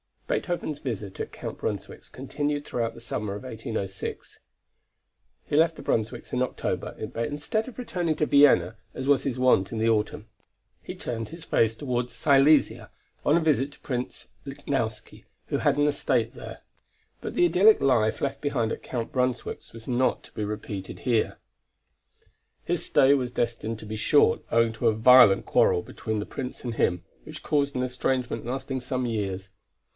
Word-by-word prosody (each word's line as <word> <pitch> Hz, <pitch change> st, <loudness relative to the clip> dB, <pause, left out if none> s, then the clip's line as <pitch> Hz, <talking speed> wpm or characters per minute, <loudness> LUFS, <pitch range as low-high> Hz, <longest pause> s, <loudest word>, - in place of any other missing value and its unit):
Beethoven's 175 Hz, -, -2 dB
visit 105 Hz, -8 st, -5 dB
at -, -, -5 dB
Count -, -, -6 dB
Brunswick's 100 Hz, -1 st, -5 dB
continued 145 Hz, +2 st, -3 dB
throughout 115 Hz, -1 st, -2 dB
the -, -, -12 dB
summer 105 Hz, -3 st, -4 dB
of 105 Hz, -, -8 dB
1806. 110 Hz, -5 st, -5 dB, 1.0 s
He -, -, -3 dB
left 165 Hz, +1 st, +4 dB
the -, -, -9 dB
Brunswicks 110 Hz, -1 st, -2 dB
in 125 Hz, -, 0 dB
October, 130 Hz, -, -2 dB, 0.2 s
but 115 Hz, 0 st, -1 dB
instead 150 Hz, -, -2 dB
of 255 Hz, -, -10 dB
returning 175 Hz, -10 st, -1 dB
to 150 Hz, -, +1 dB
Vienna 140 Hz, -5 st, +5 dB, 0.2 s
as 130 Hz, -, -4 dB
was 145 Hz, -, +4 dB
his 130 Hz, -3 st, -2 dB
wont 125 Hz, -7 st, +3 dB
in 115 Hz, -, -4 dB
the 110 Hz, +1 st, +2 dB
autumn, 110 Hz, 0 st, 0 dB, 0.5 s
he -, -, -7 dB
turned 115 Hz, -2 st, -4 dB
his 165 Hz, 0 st, -9 dB
face 115 Hz, -7 st, +2 dB
toward 125 Hz, -2 st, -2 dB
Silesia, 140 Hz, +2 st, +3 dB, 0.4 s
on 150 Hz, -, +4 dB
a -, -, +1 dB
visit 145 Hz, -3 st, +1 dB
to -, -, -17 dB
Prince 125 Hz, -2 st, -5 dB, 0.2 s
Lichnowsky -, -, -4 dB, 0.2 s
who -, -, 0 dB
had -, -, +2 dB
an 145 Hz, -, +3 dB
estate 125 Hz, -5 st, 0 dB
there. 120 Hz, -, -9 dB, 0.6 s
But -, -, -6 dB
the 175 Hz, -, +4 dB
idyllic 185 Hz, +6 st, +5 dB
life 120 Hz, -5 st, +2 dB
left 140 Hz, -, -2 dB
behind 125 Hz, -6 st, 0 dB
at -, -, -4 dB
Count 120 Hz, -3 st, -4 dB
Brunswick's 125 Hz, -1 st, -2 dB
was 115 Hz, 0 st, -10 dB
not 125 Hz, 0 st, +1 dB
to -, -, -16 dB
be 105 Hz, -, -3 dB
repeated 105 Hz, -2 st, -6 dB
here. 120 Hz, -4 st, 0 dB, 1.3 s
His -, -, -1 dB
stay 135 Hz, +1 st, +5 dB
was 125 Hz, -3 st, -1 dB
destined 115 Hz, -2 st, -2 dB
to -, -, -9 dB
be 110 Hz, +1 st, -5 dB
short 110 Hz, -3 st, +3 dB
owing 115 Hz, -1 st, +3 dB
to 115 Hz, +1 st, 0 dB
a 110 Hz, -, +3 dB
violent 110 Hz, -3 st, +7 dB
quarrel 90 Hz, -, +3 dB
between 110 Hz, -1 st, -4 dB
the 105 Hz, -, -3 dB
Prince 130 Hz, -2 st, -6 dB
and 120 Hz, -2 st, -4 dB
him, 90 Hz, -4 st, +1 dB, 0.2 s
which 155 Hz, 0 st, -9 dB
caused 140 Hz, -2 st, 0 dB
an 125 Hz, -, 0 dB
estrangement 125 Hz, -2 st, -2 dB
lasting 130 Hz, +1 st, -3 dB
some 130 Hz, 0 st, -2 dB
years. 100 Hz, -4 st, -3 dB
125 Hz, 170 wpm, -26 LUFS, 110-145 Hz, 1.3 s, violent